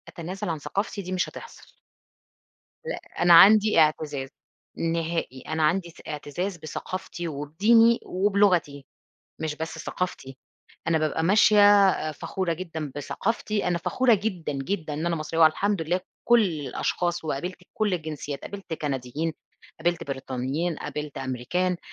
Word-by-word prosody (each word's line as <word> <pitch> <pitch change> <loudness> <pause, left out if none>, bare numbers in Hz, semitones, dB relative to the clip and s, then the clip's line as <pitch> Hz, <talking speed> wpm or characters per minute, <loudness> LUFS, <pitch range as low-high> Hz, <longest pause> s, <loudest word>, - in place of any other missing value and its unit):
أتنازل 175 +2 -6
عن 160 -2 -2
ثقافتي، 200 +6 -3
دي 185 -1 -7
مش 185 -1 0
هتحصل. - - -12 1.1
لأ - - -4 0.2
أنا 175 0 +6
عندي 210 +4 +8
إعتزاز 150 -3 +1 0.5
نهائي، 165 -5 -2
أنا 160 0 -1
عندي 170 +3 +1
س 165 - -15
إعتزاز 165 +5 -4
بثقافتي، 175 +2 -6
وبديني، 205 +11 +3
وبلغتي، 185 -7 +1 0.5
مش 155 -1 -3
بس 160 +1 -5
ثقافتي، 135 -7 -4 0.5
أنا 165 -1 +3
بابقى 155 +1 0
ماشية 205 +1 +6
أ 155 -4 -1
فخورة 175 +3 -3
جدًا 160 -4 -5
بثقافتي، 205 +7 -2
أنا 175 -1 +1
فخورة 245 +8 +2
جدًا، 190 -7 -2
جدًا 155 +3 -3
إن 155 +3 -3
أنا 170 -1 +1
مصرية 160 +1 -3
والحمد 185 +4 +3
لله. 170 +3 0 0.3
كل 240 -1 +6
الأشخاص 170 +1 -2
وقابلت 155 +5 -3 0.2
كل 210 -3 0
الجنسيات، 150 -4 -5
قابلت 195 -4 -7
كنديين، 145 +1 -3 0.5
قابلت 170 +1 0
بريطانيين، 135 +5 -3
قابلت 150 -1 -6
أمريكان، 135 +8 -1
165 Hz, 130 wpm, -26 LUFS, 150-190 Hz, 1.1 s, عندي